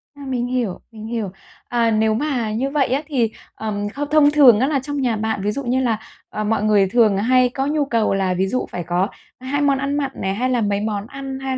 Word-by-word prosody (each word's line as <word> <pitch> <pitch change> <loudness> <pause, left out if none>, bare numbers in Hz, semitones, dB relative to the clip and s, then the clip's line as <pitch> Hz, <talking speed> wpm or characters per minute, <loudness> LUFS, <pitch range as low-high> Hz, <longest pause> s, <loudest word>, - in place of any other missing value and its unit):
À, 285 - -11
mình 245 -2 -1
hiểu, 245 -7 -2
mình 220 -1 -9
hiểu. 225 -5 -3 0.4
Ờ, 235 -2 +2
nếu 220 0 +2
mà 245 -3 -1
như 260 +5 -1
vậy 275 -2 +1
á 265 +3 0
thì, 240 -7 0 0.2
ờm, 205 -2 -3
h 280 - -9
thông 295 -1 +5
thường 265 -8 +7
á, 260 - +2
là 290 -3 +1
trong 290 +1 -4
nhà 245 -4 +1
bạn, 220 -2 -2
ví 210 - +1
dụ 280 +6 -4
như 250 +1 0
là, 230 -4 +1 0.3
à, 215 - -4
mọi 210 0 0
người 205 -3 +3
thường 215 -3 +3
hay 250 +4 +3
có 270 +2 -2
nhu 295 -1 +1
cầu 230 -6 +1
là, 190 -2 +1
ví 190 +2 0
dụ, 255 +5 -1
phải 175 - -4
có 180 +3 0 0.3
2 270 +3 -2
món 280 -1 +3
ăn 280 +1 -1
mặn 275 -2 -1
nè, 190 0 -1
hay 250 +5 -1
là 245 -2 +1
mấy 205 -1 0
món 210 -1 -3
ăn 270 0 -6
hay 265 -1 -3
240 Hz, 255 wpm, -20 LUFS, 215-270 Hz, 0.4 s, thường